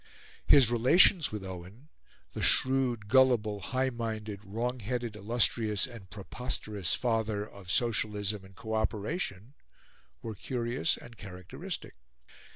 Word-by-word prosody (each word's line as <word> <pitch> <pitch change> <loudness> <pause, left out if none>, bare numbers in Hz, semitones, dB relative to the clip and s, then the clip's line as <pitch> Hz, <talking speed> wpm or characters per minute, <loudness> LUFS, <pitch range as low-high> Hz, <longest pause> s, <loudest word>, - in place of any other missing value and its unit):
His 130 -5 +7
relations 150 - +5
with 105 -2 -5
Owen 95 - -10 0.4
the - - -5
shrewd, 130 -5 +3
gullible, 120 -4 +3
high 130 +5 -1
minded, 110 -3 -5
wrong 120 +5 -3
headed, 120 0 -3
illustrious 110 0 +1
and 115 -8 -11
preposterous 105 -2 -3
father 110 -3 -1
of 100 -4 -13
Socialism 105 -2 0
and 95 0 -16
Co 110 +3 -6
operation 110 - -2 0.7
were 115 - -5
curious 120 +4 -2
and 115 -1 -13
characteristic. 90 -3 -7
110 Hz, 115 wpm, -30 LUFS, 105-125 Hz, 0.7 s, His